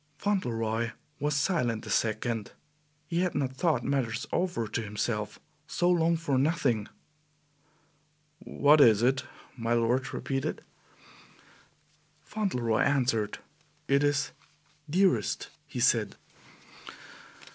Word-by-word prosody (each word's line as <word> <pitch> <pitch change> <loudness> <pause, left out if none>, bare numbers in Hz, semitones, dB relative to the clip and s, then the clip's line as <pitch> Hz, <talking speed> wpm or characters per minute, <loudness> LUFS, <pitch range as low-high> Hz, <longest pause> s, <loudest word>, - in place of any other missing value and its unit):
Fauntleroy 115 - -1 0.3
was 145 +1 0
silent 125 - 0
a - - -5
second. 110 0 -1 0.5
He 170 +2 -1
had 180 -1 0
not 135 -2 -1
thought 155 -6 +1
matters 120 -4 -1
over 175 -11 0
to 115 - -2
himself 105 0 -3 0.3
so 175 +2 +1
long 165 -1 +3
for 145 -5 0
nothing. 130 -8 +1 1.5
"What 145 +1 +4
is 110 -3 +6
it?" 130 +1 +2 0.3
my 115 -1 -1
lord 120 +3 +1
repeated. 135 -1 -3 1.6
Fauntleroy 125 - -1
answered. 120 -7 +1 0.5
"It 140 +1 +3
is 145 -1 +1 0.6
Dearest," 170 - +1 0.2
he - - -6
said. - - +2
130 Hz, 105 wpm, -29 LUFS, 115-155 Hz, 1.6 s, is